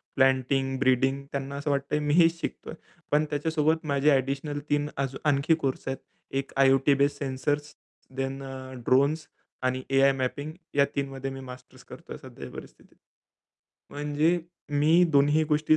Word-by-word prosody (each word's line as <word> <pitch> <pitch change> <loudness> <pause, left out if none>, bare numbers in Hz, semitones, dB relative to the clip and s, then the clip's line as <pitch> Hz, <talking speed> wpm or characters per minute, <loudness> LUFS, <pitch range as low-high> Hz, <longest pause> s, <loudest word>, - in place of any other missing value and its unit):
Planting, 135 0 +2
breeding 135 +1 +2
त्यांना 140 0 -4
असं 145 +1 -2
वाटतंय 140 +2 0
मी 150 -1 0
हेच 165 -1 +4
शिकतोय. - - -5 0.4
पण 150 +1 +3
त्याच्यासोबत 155 +1 0
माझे 140 +1 +2
ॲडिशनल 140 +2 0
3 145 0 +1
अजून 135 +2 -3
आणखी 145 +3 +3
कोर्स 135 -1 -2
आहेत. 135 0 -2 0.3
एक 135 0 -3
आय-ओ-टी 135 +1 +5
बेस्ड 140 0 +2
सेन्सर्स 145 +2 -2 0.4
देन 135 +1 -3
अ, 130 -1 -8
ड्रोन्स 145 +4 +2 0.4
आणि 130 0 0
एआय 135 0 +5
मॅपिंग 135 +3 -3 0.2
या 140 0 +5
3 140 -1 -1
मध्ये 135 0 -5
मी 135 - -7
मास्टर्स 125 -1 -12
करतोय - - -10
सध्याच्या - - -10
परिस्थितीत. - - -13 1.0
म्हणजे 150 +4 +1 0.3
मी 155 +4 +4
दोन्ही 145 +2 +4
गोष्टी 155 0 +3
140 Hz, 150 wpm, -27 LUFS, 135-150 Hz, 1.0 s, आय-ओ-टी